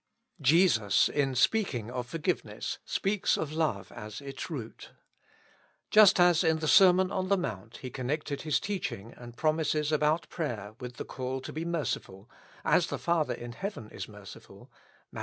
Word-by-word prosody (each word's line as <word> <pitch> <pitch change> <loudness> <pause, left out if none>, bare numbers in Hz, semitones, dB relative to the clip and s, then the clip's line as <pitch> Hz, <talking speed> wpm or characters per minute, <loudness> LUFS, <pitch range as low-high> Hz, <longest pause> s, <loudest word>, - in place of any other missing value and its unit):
Jesus, 145 - +4
in 135 -3 0
speaking 125 - +1
of 125 -1 -4
forgiveness, 165 +5 -3
speaks 195 0 0
of 155 -1 -3
love 160 -1 -1
as 110 -2 -8
its 140 +2 -7
root. 125 -9 -7 1.0
Just 215 -3 +7
as 175 -1 +5
in 160 0 +3
the 155 0 -3
Sermon 185 +1 +6
on 185 -2 -1
the 200 +1 +3
Mount 110 - -5
He 130 - -8
connected 140 +2 -3
his 155 -2 +1
teaching 170 - -4
and 120 -1 -12
promises 155 -1 +1
about 155 +2 +1
prayer 110 - -4
with 125 -1 -7
the - - -6
call 130 0 -4
to - - -8
be 160 +2 -4
merciful, 140 - -3 0.4
as - - +3
the - - -3
Father 170 -3 0
in 120 0 -8
heaven 155 - -6
is - - -6
merciful 105 -2 -13 0.4
(Matt. - - -7
150 Hz, 160 wpm, -29 LUFS, 120-170 Hz, 1.0 s, Just